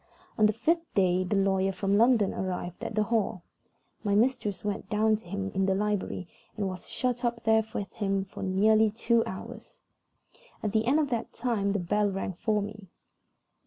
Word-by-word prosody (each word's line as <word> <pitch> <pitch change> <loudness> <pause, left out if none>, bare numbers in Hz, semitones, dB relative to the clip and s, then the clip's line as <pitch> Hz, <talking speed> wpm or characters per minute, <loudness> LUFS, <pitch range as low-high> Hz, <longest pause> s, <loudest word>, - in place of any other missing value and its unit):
On 215 - +5
the - - +2
fifth 330 +9 0
day 185 -2 +3
the 185 +3 -1
lawyer 195 -1 +2
from 195 +1 0
London 225 -2 +4
arrived 180 -1 -4
at - - -4
the 215 - +3
Hall. 210 -5 -1 0.6
My 200 -2 +1
mistress 225 -3 +1
went 200 -1 -3
down 215 0 +3
to 210 - -16
him 195 +1 -3
in 190 0 +1
the 190 - +2
library, 205 -3 -2 0.3
and 200 -2 -1
was 185 -1 -7
shut 250 -1 -1
up 235 -1 -1
there 220 0 +4
with 200 - -4
him 195 -2 -1
for 195 - -10
nearly 215 +3 +4
two 230 +2 +2
hours. 185 - -8 0.9
At 210 - 0
the 220 +1 +1
end 275 +4 +4
of 290 -3 0
that 230 -2 -2
time 225 -5 0
the - - +1
bell 205 +4 +1
rang 195 0 -3
for 210 +3 0
me. 210 -1 -8
205 Hz, 190 wpm, -28 LUFS, 195-220 Hz, 0.9 s, On